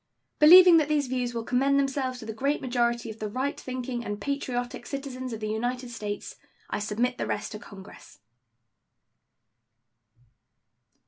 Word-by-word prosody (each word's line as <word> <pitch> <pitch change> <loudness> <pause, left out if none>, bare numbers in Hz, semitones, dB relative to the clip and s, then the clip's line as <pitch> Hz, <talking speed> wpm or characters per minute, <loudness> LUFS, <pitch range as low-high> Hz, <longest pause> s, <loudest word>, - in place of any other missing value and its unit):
Believing 350 +3 +9
that 305 -2 +2
these 295 -2 +2
views 250 -1 -2
will 230 - -2
commend 270 +4 +2
themselves 270 -2 -1
to 225 - -9
the 220 - -5
great 275 +7 0
majority 235 -2 -1
of 220 - -12
the 215 - -3
right 260 +6 -2
thinking 250 -1 -4
and 205 -2 -4
patriotic 245 -1 -3
citizens 260 -2 -5
of 220 -1 -6
the 215 - -2
United 245 +3 -3
States, 210 -3 -6 0.3
I - - -1
submit 230 +4 -1
the - - -2
rest 210 +1 -3
to 210 - -7
Congress. 195 -1 -13
250 Hz, 150 wpm, -27 LUFS, 225-275 Hz, 0.3 s, Believing